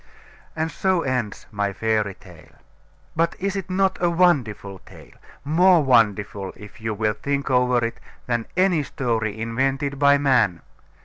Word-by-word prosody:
And 160 +1 -2
so 185 +2 0
ends 125 -6 -3
my 100 -1 -2
fairy 110 -2 -1
tale. - - -17 0.6
But 165 +1 +1
is 195 +1 -2
it 195 -1 -4
not 190 0 +1
a 175 - +3
wonderful 130 - +1
tale? - - -16 0.3
More 170 +2 +4
wonderful, 105 -6 +1
if 105 +1 -13
you 110 -1 -3
will 105 0 0
think 140 +5 -3
over 125 -1 +2
it, 115 - -5 0.3
than 120 -2 -2
any 185 -4 +3
story 115 -6 -2
invented 135 +5 -1
by 140 0 +5
man. 120 - +2
125 Hz, 145 wpm, -23 LUFS, 110-160 Hz, 0.6 s, by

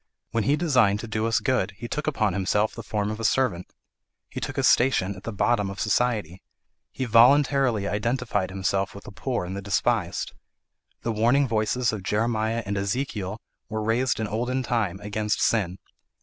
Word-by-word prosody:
When 115 - 0
he 140 - +3
designed 125 -11 +3
to 115 - -7
do 110 +1 -1
us 115 - +2
good, 125 -8 0
he 120 - -6
took 150 +5 -4
upon 110 -10 +1
himself 105 +3 +1
the - - -7
form 105 -1 -2
of 110 - -5
a - - -5
servant. 110 -7 +1 0.6
He - - -5
took - - -4
his - - +2
station 120 -6 +3
at 95 - -12
the 115 - -3
bottom 105 0 +1
of 100 - -7
society. 105 -5 0 0.5
He 130 - -4
voluntarily 125 -2 +4
identified 105 -2 -1
himself 95 0 -1
with 100 - -10
the - - -10
poor 120 -2 -3
and 95 +2 -5
the 100 - -4
despised. 100 -1 0 0.7
The 115 - 0
warning 120 +6 +3
voices 115 +2 0
of 105 - -4
Jeremiah 110 +2 0
and 100 +1 -2
Ezekiel 100 -1 -2 0.3
were 110 0 -3
raised 120 +4 +1
in 110 - -1
olden 120 +5 -1
time, 110 -7 -1
against 105 +1 -1
sin. 95 -5 +1
110 Hz, 180 wpm, -25 LUFS, 100-120 Hz, 0.7 s, voluntarily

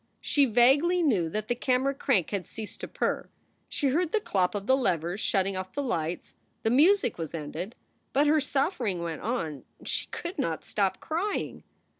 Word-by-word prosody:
She 285 -1 +3
vaguely 275 +9 +4
knew 195 - +2
that 215 +5 -3
the - - +2
camera 255 +2 +1
crank 255 - +1
had 200 -3 -2
ceased 220 -2 -7
to - - -4
purr; - - -2 0.4
she 280 - 0
heard 330 +5 +1
the 440 - +2
clop 190 - 0
of 200 -1 -3
the 260 - +5
levers 180 - 0
shutting 195 -1 +1
off 185 0 -4
the 285 - -2
lights; 170 - -2 0.3
the 225 - +2
music 305 - +4
was 165 0 -4
ended. 165 +7 -5 0.4
But 285 +2 +3
her 300 +1 +4
suffering 265 - 0
went 165 -2 -4
on; 165 - -2 0.2
she - - -1
could 345 -2 -6
not 165 - -1
stop 195 -2 0
crying. 355 +7 -2
230 Hz, 180 wpm, -28 LUFS, 185-285 Hz, 0.4 s, the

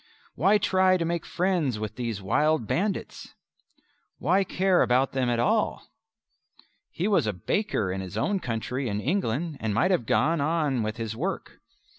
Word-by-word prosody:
Why 195 - +3
try 185 -2 +3
to 170 - -2
make 170 0 -2
friends 175 - 0
with 110 -1 -5
these 115 -5 -4
wild 150 +6 +2
bandits? 195 - -3 0.8
Why 185 +8 +2
care 185 0 +2
about 130 +2 +2
them 130 -2 0
at 120 - +1
all? 215 - 0 1.0
He 180 - -2
was 200 - +2
a 105 - 0
baker 100 - -1
in 95 +1 -3
his 95 +2 -7
own 200 - 0
country 125 0 -3
in 100 0 -2
England 155 - -1
and 110 -2 -2
might 180 +12 +2
have 130 -12 0
gone 165 -1 +2
on 150 -4 0
with 110 0 -2
this 115 -2 -4
work. - - -4
140 Hz, 165 wpm, -26 LUFS, 115-185 Hz, 1.0 s, Why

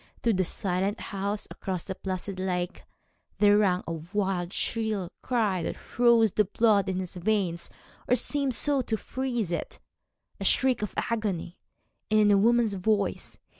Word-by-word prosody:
Through 230 - +3
the 185 -1 +2
silent 190 +2 -1
house, 200 +1 -3
across 185 -3 -4
the 190 - -4
placid 185 0 -4
lake, 180 -1 -3 0.5
there 205 -1 +5
rang 185 -3 +2
a - - -4
wild, 180 +2 -2
shrill 215 -6 -1
cry 215 -8 0
that - - -3
froze 235 -3 +3
the 210 - +2
blood 205 -1 +2
in 185 - -1
his 185 -2 -4
veins, 180 -3 0 0.4
or 250 - +4
seemed 275 +1 +1
so 280 +4 +2
to 225 -2 -2
freeze 240 -6 -3
it 170 - -4 0.6
a - - -4
shriek 260 -3 +3
of 210 - -4
agony, 200 -7 -2 0.5
and 215 0 +4
in 210 -1 +5
a 200 - +6
woman's 230 0 +3
voice. 200 +1 -1
205 Hz, 160 wpm, -27 LUFS, 185-225 Hz, 0.6 s, a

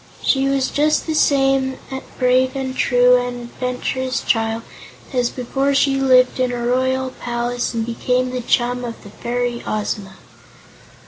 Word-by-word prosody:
She 270 0 +2
was 275 -1 +1
just 305 +1 +1
the 320 - -2
same 270 -3 +2 0.4
brave 255 +1 +2
and 260 -1 -3
true 250 -1 +4
and 245 0 -3
adventurous 255 +2 -3
child 225 0 0 0.5
as 245 -2 +1
before 270 +2 -1
she 275 0 +2
lived 255 -1 +4
in 255 -1 +1
a 240 -1 -3
royal 260 +1 0
palace 240 0 -3
and 225 -1 -1
became 250 +2 -1
the 255 0 -3
chum 245 +1 +1
of 235 -1 -7
the 200 - -12
fairy 240 +1 -3
Ozma. 205 -2 -3
250 Hz, 145 wpm, -20 LUFS, 240-265 Hz, 0.5 s, true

